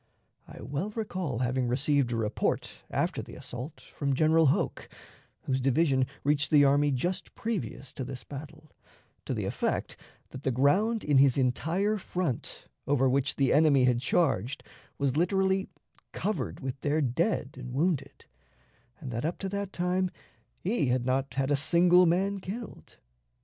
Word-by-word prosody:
I -, -, -11 dB
well 150 Hz, +9 st, -3 dB
recall 185 Hz, -, -3 dB
having 125 Hz, 0 st, 0 dB
received 135 Hz, +1 st, +1 dB
a -, -, 0 dB
report, 110 Hz, -1 st, -2 dB
after -, -, -1 dB
the -, -, -11 dB
assault, 130 Hz, +6 st, -7 dB
from 140 Hz, -2 st, -2 dB
General 160 Hz, +2 st, +4 dB
Hoke 135 Hz, -, 0 dB, 0.5 s
whose 130 Hz, -1 st, -1 dB
division 135 Hz, -1 st, +2 dB, 0.2 s
reached 145 Hz, 0 st, +2 dB
the 145 Hz, -2 st, +6 dB
army 145 Hz, +1 st, +4 dB
just 170 Hz, +8 st, -2 dB
previous 215 Hz, -, -4 dB
to 130 Hz, -, -5 dB
this 125 Hz, -1 st, -7 dB
battle 155 Hz, +2 st, -10 dB, 0.5 s
to -, -, -2 dB
the -, -, -2 dB
effect -, -, -2 dB, 0.3 s
that 130 Hz, -, -9 dB
the 135 Hz, -, 0 dB
ground 185 Hz, -, +2 dB
in 145 Hz, -3 st, +4 dB
his 135 Hz, -1 st, +5 dB
entire 165 Hz, +11 st, +1 dB
front, 175 Hz, -8 st, -3 dB, 0.2 s
over 135 Hz, -2 st, +3 dB
which 135 Hz, +2 st, +1 dB
the 135 Hz, -2 st, +2 dB
enemy 145 Hz, -3 st, +5 dB
had 125 Hz, -1 st, +3 dB
charged, 135 Hz, -, 0 dB, 0.3 s
was 140 Hz, -2 st, 0 dB
literally 190 Hz, +2 st, +1 dB, 0.4 s
covered 210 Hz, +3 st, -3 dB
with 130 Hz, 0 st, -5 dB
their 150 Hz, +2 st, +1 dB
dead 140 Hz, -, 0 dB
and 125 Hz, -1 st, -8 dB
wounded; 155 Hz, +3 st, -1 dB, 0.7 s
and 135 Hz, -6 st, -7 dB
that 115 Hz, 0 st, -3 dB
up 165 Hz, +3 st, -1 dB
to 195 Hz, -, -4 dB
that 200 Hz, 0 st, -3 dB
time 180 Hz, +1 st, 0 dB, 0.5 s
he 185 Hz, -, 0 dB
had 125 Hz, 0 st, +1 dB
not 135 Hz, +2 st, -1 dB
had 135 Hz, +1 st, 0 dB
a -, -, +5 dB
single 175 Hz, +4 st, +5 dB
man 195 Hz, +4 st, +1 dB
killed. 215 Hz, +5 st, -8 dB
145 Hz, 155 wpm, -29 LUFS, 130-180 Hz, 0.7 s, the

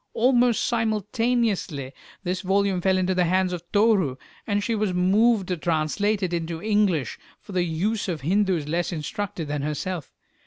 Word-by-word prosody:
Almost 245 Hz, -1 st, +3 dB
simultaneously 220 Hz, -, 0 dB, 0.3 s
this 185 Hz, 0 st, -2 dB
volume 195 Hz, -1 st, +1 dB
fell 190 Hz, +1 st, +2 dB
into 185 Hz, 0 st, +1 dB
the 180 Hz, -1 st, +2 dB
hands 185 Hz, +1 st, +1 dB
of 175 Hz, -, -4 dB
Toru, 205 Hz, -, +3 dB, 0.3 s
and 205 Hz, -1 st, 0 dB
she 230 Hz, -, -1 dB
was 210 Hz, -4 st, 0 dB
moved 200 Hz, +3 st, +3 dB
to 180 Hz, -, -1 dB
translate 175 Hz, +6 st, 0 dB
it 180 Hz, -1 st, -1 dB
into 165 Hz, -1 st, -3 dB
English, 200 Hz, -, +1 dB, 0.2 s
for -, -, -13 dB
the 185 Hz, -2 st, +1 dB
use 200 Hz, +7 st, -1 dB
of 165 Hz, -5 st, -3 dB
Hindus 180 Hz, -1 st, +1 dB
less 170 Hz, +4 st, -1 dB
instructed 175 Hz, +1 st, -4 dB
than 145 Hz, 0 st, -2 dB
herself. 150 Hz, +2 st, -3 dB
185 Hz, 160 wpm, -24 LUFS, 170-210 Hz, 0.3 s, Almost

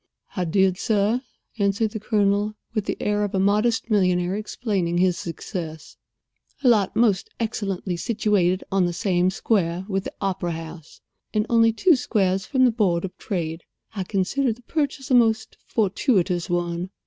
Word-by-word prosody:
"I 180 Hz, -3 st, -1 dB
did, 190 Hz, +2 st, +2 dB
sir," 220 Hz, +2 st, +1 dB, 0.4 s
answered 200 Hz, +2 st, +1 dB
the 220 Hz, -, -5 dB
Colonel, 210 Hz, -1 st, +1 dB, 0.2 s
with 215 Hz, -3 st, -1 dB
the -, -, -2 dB
air 210 Hz, 0 st, 0 dB
of 205 Hz, -1 st, -2 dB
a -, -, +2 dB
modest 215 Hz, +4 st, +1 dB
millionaire 180 Hz, -2 st, +2 dB
explaining 205 Hz, -5 st, -2 dB
his 180 Hz, 0 st, +3 dB
success; 165 Hz, -2 st, -6 dB, 0.7 s
"a -, -, +3 dB
lot 210 Hz, -5 st, +3 dB
most 215 Hz, -5 st, +2 dB
excellently 195 Hz, -5 st, -2 dB
situated 200 Hz, -4 st, +1 dB
on 190 Hz, -2 st, +3 dB
the 175 Hz, -, -3 dB
same 180 Hz, -1 st, +1 dB
square 185 Hz, -3 st, 0 dB
with 195 Hz, -2 st, -2 dB
the -, -, -5 dB
opera 190 Hz, -3 st, -2 dB
house, 160 Hz, -1 st, -9 dB, 0.3 s
and 210 Hz, 0 st, +2 dB
only 230 Hz, -1 st, +5 dB
two 335 Hz, +9 st, +4 dB
squares 195 Hz, -6 st, 0 dB
from 260 Hz, -2 st, +3 dB
the 245 Hz, -, +4 dB
board 190 Hz, -6 st, +1 dB
of 185 Hz, -1 st, -8 dB
trade. 165 Hz, -3 st, -3 dB, 0.3 s
I 195 Hz, -, -2 dB
consider 215 Hz, +8 st, 0 dB
the 240 Hz, +3 st, -9 dB
purchase 285 Hz, -1 st, -2 dB
a -, -, +4 dB
most 225 Hz, -3 st, +3 dB
fortuitous 190 Hz, -4 st, +1 dB
one. 175 Hz, +1 st, -1 dB
200 Hz, 160 wpm, -23 LUFS, 180-220 Hz, 0.7 s, only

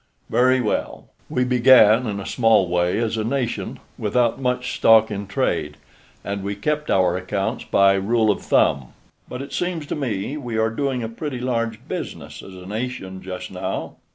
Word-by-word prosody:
"Very 130 Hz, +1 st, +4 dB
well. 110 Hz, -, -3 dB, 0.2 s
We 125 Hz, -, +1 dB
began 125 Hz, -2 st, +5 dB
in 100 Hz, -1 st, -3 dB
a 100 Hz, -, -7 dB
small 115 Hz, -6 st, +3 dB
way 90 Hz, 0 st, +1 dB
as 115 Hz, 0 st, -1 dB
a 110 Hz, -, -1 dB
nation, 125 Hz, 0 st, -2 dB, 0.2 s
without 120 Hz, +4 st, +1 dB
much 125 Hz, -1 st, -1 dB
stock 110 Hz, -1 st, +5 dB
in 100 Hz, -1 st, -4 dB
trade, 75 Hz, -6 st, -1 dB, 0.5 s
and 100 Hz, 0 st, -4 dB
we 100 Hz, +1 st, -3 dB
kept 150 Hz, +8 st, -2 dB
our 90 Hz, -2 st, +3 dB
accounts 95 Hz, +2 st, -3 dB
by 100 Hz, 0 st, +4 dB
rule 110 Hz, +3 st, +2 dB
of 100 Hz, -, -3 dB
thumb. 65 Hz, -3 st, +1 dB, 0.4 s
But 125 Hz, +2 st, -5 dB
it 140 Hz, -, -10 dB
seems 175 Hz, -4 st, -2 dB
to -, -, -4 dB
me 125 Hz, -1 st, -3 dB
we 120 Hz, -6 st, -4 dB
are 110 Hz, 0 st, +1 dB
doing 130 Hz, 0 st, -2 dB
a -, -, -2 dB
pretty 130 Hz, +3 st, -5 dB
large 115 Hz, -3 st, -2 dB
business -, -, -6 dB
as 95 Hz, -, -12 dB
a 90 Hz, 0 st, -11 dB
nation 105 Hz, -3 st, -5 dB
just 95 Hz, -1 st, -7 dB
now." -, -, -4 dB
115 Hz, 180 wpm, -22 LUFS, 100-125 Hz, 0.5 s, began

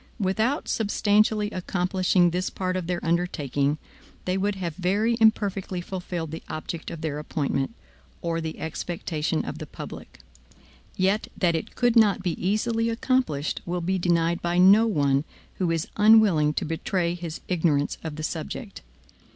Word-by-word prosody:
Without 220 Hz, -, 0 dB
substantially 210 Hz, 0 st, +2 dB
accomplishing 180 Hz, -1 st, +1 dB
this 180 Hz, +2 st, -1 dB
part 185 Hz, -1 st, -2 dB
of 185 Hz, -3 st, -3 dB
their 175 Hz, -1 st, -2 dB
undertaking, 150 Hz, -4 st, 0 dB, 0.5 s
they 185 Hz, -, 0 dB
would 200 Hz, +1 st, 0 dB
have 175 Hz, -4 st, -3 dB
very 200 Hz, +6 st, +1 dB
imperfectly 200 Hz, -4 st, +2 dB
fulfilled 175 Hz, -3 st, -5 dB
the 160 Hz, -, -6 dB
object 155 Hz, +1 st, -5 dB
of 165 Hz, -, -7 dB
their 150 Hz, -2 st, -2 dB
appointment, 150 Hz, +4 st, -2 dB, 0.4 s
or 165 Hz, -1 st, -2 dB
the 160 Hz, -1 st, -5 dB
expectation 160 Hz, -1 st, -3 dB
of -, -, -6 dB
the -, -, -6 dB
public; -, -, -9 dB, 0.8 s
yet 195 Hz, +3 st, +1 dB
that 175 Hz, -3 st, +2 dB
it 160 Hz, -, -4 dB
could 245 Hz, -1 st, +2 dB
not 210 Hz, -4 st, +4 dB
be 180 Hz, -, +1 dB
easily 225 Hz, +4 st, +1 dB
accomplished, 230 Hz, -, 0 dB
will 180 Hz, +1 st, -2 dB
be 185 Hz, +2 st, -1 dB
denied 170 Hz, -1 st, +1 dB
by 175 Hz, 0 st, 0 dB
no 200 Hz, +5 st, +7 dB
one 140 Hz, -8 st, +2 dB, 0.4 s
who 180 Hz, -3 st, +1 dB
is 165 Hz, 0 st, -1 dB
unwilling 210 Hz, -8 st, +6 dB
to -, -, -1 dB
betray 170 Hz, +2 st, -1 dB
his 170 Hz, -2 st, -6 dB
ignorance 160 Hz, -5 st, +1 dB
of 160 Hz, -2 st, -5 dB
the 155 Hz, -, -6 dB
subject. 70 Hz, -, -5 dB
180 Hz, 150 wpm, -25 LUFS, 165-205 Hz, 0.8 s, no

